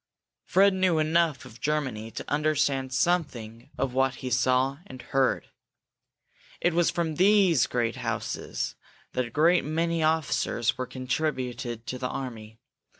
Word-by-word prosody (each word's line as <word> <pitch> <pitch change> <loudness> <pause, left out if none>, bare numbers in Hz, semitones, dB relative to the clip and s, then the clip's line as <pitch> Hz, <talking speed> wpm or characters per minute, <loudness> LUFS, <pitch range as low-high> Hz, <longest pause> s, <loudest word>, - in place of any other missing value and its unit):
Fred 195 +1 +4
knew 185 -3 +2
enough 155 -2 +1
of 120 -2 -14
Germany 130 -8 -1
to - - -7
understand 145 -3 +1
something 125 -8 -1
of 135 -2 -1
what 130 0 +2
he 125 +1 -6
saw 130 +2 +2
and 130 - -10
heard. 135 +1 0 1.1
It 175 - +1
was 170 0 +3
from 160 -3 -2
these 185 - +4
great 120 +1 -1
houses 115 -3 -3 0.4
that 125 - 0
a - - -8
great 165 +8 +3
many 165 +2 0
officers 155 -7 +1
were 130 0 -4
contributed 130 -3 -3
to 125 +2 -5
the 125 0 -2
army. 110 -5 -6
135 Hz, 140 wpm, -27 LUFS, 125-160 Hz, 1.1 s, Fred